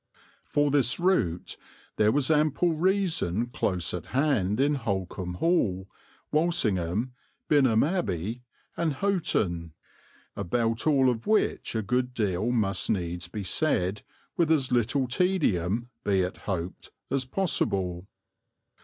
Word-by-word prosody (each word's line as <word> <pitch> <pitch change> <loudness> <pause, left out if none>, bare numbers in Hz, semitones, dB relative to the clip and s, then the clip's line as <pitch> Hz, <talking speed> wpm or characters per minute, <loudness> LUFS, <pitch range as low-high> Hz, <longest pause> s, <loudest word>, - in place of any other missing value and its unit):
For 145 -1 +1
this 135 -1 +2
route 170 - 0 0.4
there 105 0 +4
was 145 +3 +2
ample 155 +3 +2
reason 165 - +1
close 90 -8 -2
at 90 - -5
hand, 130 -7 +1
in 145 +2 +3
Holkham 95 -5 -3
Hall, 95 - +1 0.4
Walsingham, 120 - +1 0.3
Binham 130 -7 +4
Abbey, 115 - -2 0.3
and 165 -3 0
Houghton, 105 - -1 0.6
about 115 - -1
all 135 -4 +4
of 115 -2 -6
which 215 - +1
a 110 - 0
good 125 +4 -1
deal 105 0 0
must 105 -6 0
needs 90 -3 -2
be 100 +3 -6
said 100 - 0 0.3
with 170 -5 +2
as 135 -5 +2
little 125 +2 +1
tedium, 120 - 0
be 95 -2 +2
it 90 +1 -3
hoped, 90 -3 -5 0.2
as 135 -1 +1
possible. 100 - 0
120 Hz, 120 wpm, -27 LUFS, 95-150 Hz, 0.6 s, there